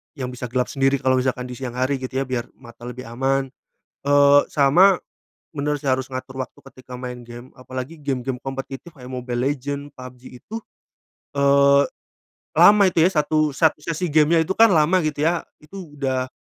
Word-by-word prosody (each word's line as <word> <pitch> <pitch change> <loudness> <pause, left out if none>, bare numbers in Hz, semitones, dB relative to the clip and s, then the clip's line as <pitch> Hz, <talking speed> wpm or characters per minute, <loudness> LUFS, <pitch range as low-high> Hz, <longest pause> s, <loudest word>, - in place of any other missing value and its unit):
yang 130 -4 -4
bisa 125 0 -6
gelap 125 0 0
sendiri 135 0 +2
kalau 130 -1 +2
misalkan 125 -1 -1
di 125 - -7
siang 125 -1 -6
hari 130 +2 0
gitu 130 0 -4
ya - - -9
biar 125 -2 -3
mata 120 0 -15
lebih 125 +1 -7
aman. 135 +3 0 0.6
Eee, 145 0 +6
sama, 170 +7 +5 0.5
bener 150 -1 -1
sih 140 - -5
harus 130 0 -1
ngatur 130 +1 -6
waktu 130 - -6
ketika 130 -1 -11
main 125 -1 -7
gim 120 +2 -11
apalagi 130 +5 -7
gim-gim 135 -2 -3
kompetitif 135 +4 -7
kayak 125 -3 -12
Mobile 125 -1 -3
Legend, 140 +1 -3
PUBG 130 -1 -12
itu, 220 - -8 0.8
eee, 140 0 +5 0.7
lama 205 0 +7
itu 165 -2 +3
ya, 185 - +2
satu 155 -1 +1
satu 160 +2 +2
sesi 170 +2 -2
game-nya 160 +2 +4
itu 175 - -1
kan 225 0 +7
lama 165 +3 +3
gitu 150 -1 -2
ya, 170 +1 +1 0.2
itu 165 -1 -11
udah, 130 -2 -1
135 Hz, 175 wpm, -22 LUFS, 130-150 Hz, 0.8 s, lama